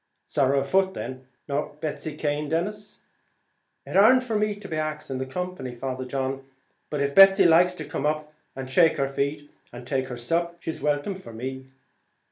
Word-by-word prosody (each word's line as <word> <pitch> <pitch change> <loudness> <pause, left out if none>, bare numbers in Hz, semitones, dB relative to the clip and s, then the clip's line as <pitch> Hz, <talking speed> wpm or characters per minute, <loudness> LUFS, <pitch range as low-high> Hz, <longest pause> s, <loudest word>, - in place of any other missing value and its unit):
"Sorrow 140 0 +2
a - - -1
foot, 190 +6 +1
then!" 130 +1 -6 0.2
"Nor 145 +1 -2
Betsy 155 0 -4
Cane, 150 -1 -1
Denis?" 205 +6 -3 0.8
"It - - -7
ar'nt 250 +6 +6
for 230 -3 -3
me 210 0 +1
to 195 -5 -7
ax 155 -1 -3
the 130 0 -3
company, 180 -5 -5
Father 130 +1 -4
John, 135 +1 -3 0.5
but 150 -2 -2
if 140 0 0
Betsy 195 +1 +8
likes 175 +2 +5
to 155 - -6
come 145 - -2
up 155 0 -2 0.2
and 135 -1 -5
shake 160 +5 +4
her 135 -1 +1
feet 140 +2 -2 0.2
and 120 0 -10
take 130 0 -1
her 125 -2 -6
sup, 170 +8 -1
she's 160 -2 -5
welcome 145 +6 0
for 185 -11 -11
me." 130 +3 -6
150 Hz, 180 wpm, -25 LUFS, 135-180 Hz, 0.8 s, Betsy